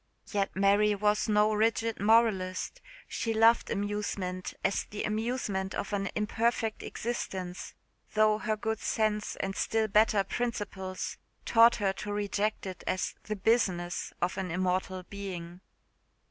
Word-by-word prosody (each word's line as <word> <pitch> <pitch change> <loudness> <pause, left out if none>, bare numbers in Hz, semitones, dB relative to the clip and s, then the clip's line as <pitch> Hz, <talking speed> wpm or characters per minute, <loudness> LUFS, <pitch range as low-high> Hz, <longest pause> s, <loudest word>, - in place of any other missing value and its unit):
Yet 200 -2 0
Mary 200 +2 +4
was 210 +1 +1
no 210 0 +4
rigid 225 +1 +1
moralist. 210 - +2 0.3
She 225 -1 -2
loved 225 +1 +5
amusement 200 -3 -3
as 195 - +1
the 210 - -5
amusement 215 -3 -2
of 205 - -3
an 195 -1 0
imperfect 220 +1 0
existence, 190 -6 -4 0.4
though 215 0 +4
her 220 -2 -1
good 220 0 -2
sense 215 -1 0
and 195 0 -3
still 220 -1 +1
better 210 -1 +4
principles 195 -5 -4 0.3
taught 230 +1 +6
her 195 -3 0
to 205 +1 -6
reject 205 +1 -1
it 185 -2 -7
as 185 - -1
the 215 - -2
business 185 -5 +1
of 180 +2 0
an 190 -1 -3
immortal 185 +1 -1
being. 180 -3 -7
210 Hz, 130 wpm, -30 LUFS, 190-220 Hz, 0.4 s, taught